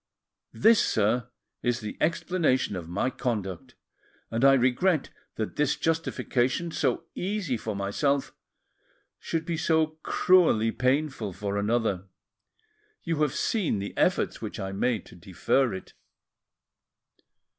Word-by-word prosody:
This, 225 Hz, 0 st, +5 dB
sir, 115 Hz, +3 st, +1 dB, 0.3 s
is 120 Hz, -1 st, 0 dB
the 105 Hz, -3 st, -6 dB
explanation 160 Hz, -, +1 dB
of 85 Hz, -2 st, -6 dB
my 100 Hz, +9 st, 0 dB
conduct, 105 Hz, -9 st, -4 dB, 0.6 s
and 115 Hz, +2 st, -1 dB
I 135 Hz, 0 st, +8 dB
regret 135 Hz, +6 st, +2 dB, 0.2 s
that 110 Hz, -, -4 dB
this 150 Hz, -1 st, +2 dB
justification, 165 Hz, -2 st, 0 dB
so -, -, 0 dB
easy 185 Hz, -7 st, -2 dB
for 110 Hz, -2 st, -4 dB
myself, 135 Hz, +8 st, 0 dB, 0.9 s
should 165 Hz, -1 st, -3 dB
be 170 Hz, -1 st, -2 dB
so 160 Hz, -1 st, +1 dB
cruelly 160 Hz, -12 st, +3 dB
painful 130 Hz, -4 st, 0 dB
for 100 Hz, +2 st, -4 dB
another. 100 Hz, -2 st, 0 dB, 1.0 s
You 165 Hz, -3 st, -1 dB
have 150 Hz, -2 st, +1 dB
seen 205 Hz, -, 0 dB
the 100 Hz, +1 st, -5 dB
efforts -, -, +1 dB
which -, -, -6 dB
I 95 Hz, 0 st, -3 dB
made 105 Hz, +1 st, -1 dB
to -, -, -14 dB
defer 95 Hz, +8 st, 0 dB
it." 95 Hz, -, -8 dB
125 Hz, 125 wpm, -27 LUFS, 105-160 Hz, 1.0 s, I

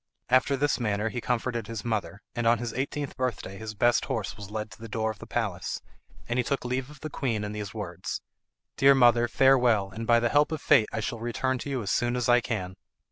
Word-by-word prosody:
After 130 Hz, +2 st, +4 dB
this 145 Hz, 0 st, +1 dB
manner 105 Hz, -1 st, 0 dB
he 120 Hz, +1 st, -4 dB
comforted 120 Hz, -2 st, -1 dB
his 115 Hz, -2 st, -6 dB
mother, 110 Hz, -3 st, -2 dB
and 120 Hz, -1 st, -1 dB
on 120 Hz, +1 st, +5 dB
his 120 Hz, -1 st, -4 dB
eighteenth 140 Hz, +2 st, -3 dB
birthday 115 Hz, -6 st, -3 dB
his 110 Hz, -1 st, -6 dB
best 120 Hz, +3 st, +3 dB
horse 115 Hz, -8 st, -3 dB
was 100 Hz, -2 st, -9 dB
led 105 Hz, 0 st, -4 dB
to -, -, -13 dB
the 115 Hz, -, -7 dB
door 110 Hz, +1 st, -1 dB
of 105 Hz, -, -11 dB
the -, -, -10 dB
palace, -, -, -2 dB, 0.5 s
and 120 Hz, +1 st, 0 dB
he -, -, +3 dB
took 135 Hz, +1 st, -2 dB
leave 125 Hz, +2 st, -2 dB
of 150 Hz, -1 st, -14 dB
the 155 Hz, -, -4 dB
queen 115 Hz, -7 st, -1 dB
in 105 Hz, -, -3 dB
these 105 Hz, 0 st, -6 dB
words, 90 Hz, -6 st, -4 dB, 0.6 s
"Dear 140 Hz, 0 st, +7 dB
mother, 120 Hz, -2 st, +5 dB
farewell, 120 Hz, -7 st, +4 dB
and 115 Hz, +3 st, -6 dB
by 115 Hz, 0 st, +6 dB
the 120 Hz, 0 st, +1 dB
help 145 Hz, +3 st, +3 dB
of 160 Hz, -, -2 dB
fate 110 Hz, -7 st, +4 dB
I 110 Hz, -, -2 dB
shall 115 Hz, +1 st, -3 dB
return 125 Hz, +3 st, -1 dB
to 145 Hz, -, -5 dB
you 130 Hz, -4 st, -2 dB
as 100 Hz, -, -2 dB
soon 120 Hz, 0 st, +1 dB
as 125 Hz, -1 st, 0 dB
I 120 Hz, 0 st, +5 dB
can." 95 Hz, -6 st, -4 dB
120 Hz, 240 wpm, -27 LUFS, 110-130 Hz, 0.6 s, Dear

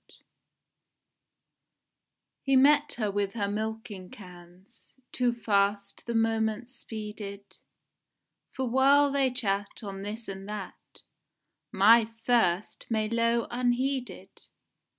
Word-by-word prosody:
ENIGMA -, -, -21 dB, 2.2 s
He 270 Hz, -1 st, +1 dB
met 290 Hz, +2 st, +5 dB
her 215 Hz, -4 st, -2 dB
with 200 Hz, +1 st, -2 dB
her 205 Hz, -3 st, -1 dB
milking 215 Hz, -2 st, -5 dB
cans, 180 Hz, +3 st, -15 dB, 0.2 s
Too 245 Hz, -1 st, +1 dB
fast 200 Hz, -3 st, -1 dB
the 235 Hz, -, -2 dB
moments 225 Hz, +2 st, 0 dB
speeded, 210 Hz, -3 st, -8 dB, 0.9 s
For 260 Hz, -1 st, -3 dB
while 275 Hz, +3 st, +4 dB
they 275 Hz, -1 st, +2 dB
chat 205 Hz, -5 st, -2 dB
on 195 Hz, -1 st, -6 dB
this 215 Hz, +3 st, -6 dB
and 195 Hz, 0 st, -7 dB
that 205 Hz, -3 st, -9 dB, 0.7 s
My 225 Hz, +2 st, +6 dB, 0.2 s
first 210 Hz, -6 st, +1 dB
may 215 Hz, -2 st, 0 dB
low 230 Hz, 0 st, +1 dB
unheeded. 245 Hz, -5 st, -2 dB
220 Hz, 105 wpm, -28 LUFS, 200-245 Hz, 2.2 s, My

